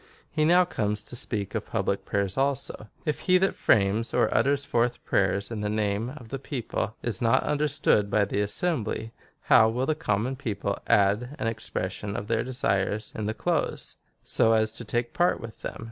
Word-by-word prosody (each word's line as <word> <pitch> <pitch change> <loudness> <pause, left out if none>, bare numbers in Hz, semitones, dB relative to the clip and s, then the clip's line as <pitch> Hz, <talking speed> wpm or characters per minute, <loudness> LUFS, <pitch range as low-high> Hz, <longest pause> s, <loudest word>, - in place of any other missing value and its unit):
He 155 0 +1
now 180 +3 +5
comes 105 - -2
to 115 - -6
speak 105 -4 -2
of - - -3
public - - -1
prayers 100 -2 -1
also. 135 -5 -1
" - - -33
If 150 - -1
he 185 - +7
that 190 +1 +2
frames 105 +3 +2
or - - +2
utters 140 +3 +2
forth 120 +1 +1
praj^ers 100 +2 +1
in 110 -2 -4
the 105 - -1
name 105 +1 -1
of 120 -6 -12
the 135 - -4
people 120 -5 -3
is 115 -6 -1
not 115 -1 +3
understood 145 -8 +2
by 105 0 +3
the 100 +1 -1
assembly, 115 - -1 0.3
how 110 - +5
will 125 +3 -1
the 155 - +1
common 130 -3 -1
people 100 -6 -3
add 105 +7 +2
an - - -3
expression 105 -2 -3
of 110 - -3
their 115 -1 +1
desires 105 -4 -1
in 105 -1 -3
the 110 - -2
close, - - -2 0.3
so 115 - +3
as 110 0 +3
to 115 +2 -4
take 120 +2 -2
part 175 +1 +2
in 115 - -7
them - - -6
115 Hz, 190 wpm, -27 LUFS, 105-130 Hz, 0.3 s, he